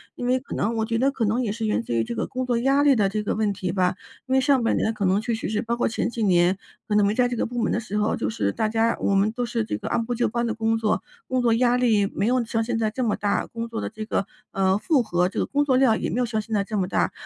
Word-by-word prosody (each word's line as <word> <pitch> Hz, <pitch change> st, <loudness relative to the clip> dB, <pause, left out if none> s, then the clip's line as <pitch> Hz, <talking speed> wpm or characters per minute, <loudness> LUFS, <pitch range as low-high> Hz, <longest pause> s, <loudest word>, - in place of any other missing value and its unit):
因 245 Hz, -, -5 dB
为 255 Hz, +1 st, +2 dB
可 270 Hz, -, -8 dB
能 225 Hz, +3 st, 0 dB
我 220 Hz, -, +1 dB
觉 230 Hz, 0 st, -1 dB
得 265 Hz, +4 st, +2 dB
可 250 Hz, -5 st, -1 dB
能 225 Hz, +5 st, +1 dB
也 215 Hz, -, -1 dB
是 225 Hz, +1 st, -3 dB
源 215 Hz, -, 0 dB
自 -, -, -4 dB
于 115 Hz, -1 st, +2 dB
这 120 Hz, -, -5 dB
个 -, -, -1 dB
工 255 Hz, 0 st, -3 dB
作 245 Hz, -2 st, 0 dB
压 270 Hz, +3 st, +3 dB
力 285 Hz, -2 st, +5 dB
的 205 Hz, -4 st, +2 dB
这 210 Hz, +2 st, -2 dB
个 -, -, -1 dB
问 215 Hz, -1 st, +1 dB
题 185 Hz, -2 st, -3 dB
吧， 180 Hz, -1 st, +1 dB, 0.3 s
因 260 Hz, -, -2 dB
为 265 Hz, -, +5 dB
上 265 Hz, -2 st, +3 dB
半 230 Hz, -, +1 dB
年 220 Hz, -, 0 dB
可 215 Hz, -, -4 dB
能 190 Hz, +1 st, +3 dB
确 230 Hz, +2 st, -2 dB
实 225 Hz, -, -4 dB
是 215 Hz, 0 st, 0 dB
包 235 Hz, 0 st, -2 dB
括 240 Hz, -, 0 dB
前 230 Hz, -, -1 dB
几 235 Hz, -1 st, -3 dB
年， 180 Hz, -1 st, +3 dB, 0.3 s
可 210 Hz, -, 0 dB
能 210 Hz, -1 st, +4 dB
没 205 Hz, -, +2 dB
在 250 Hz, +1 st, +2 dB
这 245 Hz, -, -3 dB
个 -, -, 0 dB
部 240 Hz, 0 st, -3 dB
门 225 Hz, -, +1 dB
的 -, -, +1 dB
时 210 Hz, -1 st, -4 dB
候， 210 Hz, +1 st, +1 dB
就 105 Hz, -, -2 dB
是 100 Hz, -2 st, -1 dB
大 220 Hz, -, 0 dB
家 225 Hz, +1 st, +1 dB
我 200 Hz, -, +1 dB
们 195 Hz, +2 st, +3 dB
都 245 Hz, +1 st, -2 dB
是 230 Hz, -2 st, -2 dB
这 -, -, -3 dB
个 -, -, -6 dB
按 235 Hz, -1 st, 0 dB
部 245 Hz, -, -2 dB
就 240 Hz, -, +1 dB
班 235 Hz, +2 st, -1 dB
地 225 Hz, -, -1 dB
工 225 Hz, 0 st, 0 dB
作， 220 Hz, -1 st, 0 dB, 0.3 s
工 255 Hz, 0 st, 0 dB
作 235 Hz, -2 st, +3 dB
压 245 Hz, +1 st, +3 dB
力 225 Hz, -5 st, +3 dB
没 200 Hz, -, 0 dB
有 250 Hz, 0 st, +2 dB
像 225 Hz, 0 st, -1 dB
现 235 Hz, 0 st, -2 dB
在 220 Hz, -1 st, +1 dB
这 255 Hz, +3 st, -2 dB
么 220 Hz, -3 st, +1 dB
大， 205 Hz, -1 st, 0 dB
工 230 Hz, 0 st, -5 dB
作 230 Hz, -1 st, -5 dB
的 -, -, -3 dB
这 215 Hz, 0 st, -7 dB
个， 200 Hz, -, -1 dB, 0.3 s
呃， 190 Hz, 0 st, +2 dB
负 280 Hz, +5 st, +2 dB
荷， 180 Hz, -6 st, +1 dB
这 190 Hz, -, -4 dB
个 -, -, +1 dB
工 290 Hz, 0 st, 0 dB
作 265 Hz, -3 st, +2 dB
量 255 Hz, -4 st, +4 dB
也 -, -, -2 dB
没 245 Hz, -, -1 dB
有 250 Hz, -, +2 dB
像 220 Hz, -2 st, -2 dB
现 220 Hz, +1 st, -8 dB
在 200 Hz, -2 st, +2 dB
这 215 Hz, +1 st, -4 dB
么 185 Hz, -2 st, 0 dB
大。 -, -, 0 dB
225 Hz, 360 characters per minute, -24 LUFS, 205-245 Hz, 0.3 s, 力